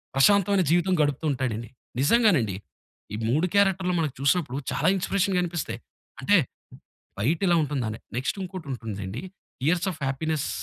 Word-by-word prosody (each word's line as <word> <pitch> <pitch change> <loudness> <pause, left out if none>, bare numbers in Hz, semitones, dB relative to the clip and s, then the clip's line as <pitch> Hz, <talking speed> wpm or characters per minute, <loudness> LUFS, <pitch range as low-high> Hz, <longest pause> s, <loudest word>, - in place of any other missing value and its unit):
ప్రశాంతమైన 200 +6 +4
జీవితం 175 +2 +3
గడుపుతూ 145 +1 0
ఉంటాడండి. 120 -4 -3 0.3
నిజంగానండి 150 - +3 0.6
ఈ - - -2
3 155 +9 +2
క్యారెక్టర్‌లు 190 -2 +3
మనం 155 -3 0
చూసినప్పుడు 140 -2 +1
చాలా - - 0
ఇన్స్పిరేషన్‌గా 190 -1 +1
అనిపిస్తాయి. 165 -10 -4 0.4
అంటే 205 +9 +5 0.8
బయటిలా 170 - +2
ఉంటుందనే 125 -7 -3 0.2
నెక్స్‌ట్ 130 +9 -1
ఇంకోటుంటుందండి. 120 - -6 0.5
'Years 180 +3 +2
of 160 - -10
happiness' 155 +2 -1
155 Hz, 120 wpm, -26 LUFS, 130-185 Hz, 0.8 s, అంటే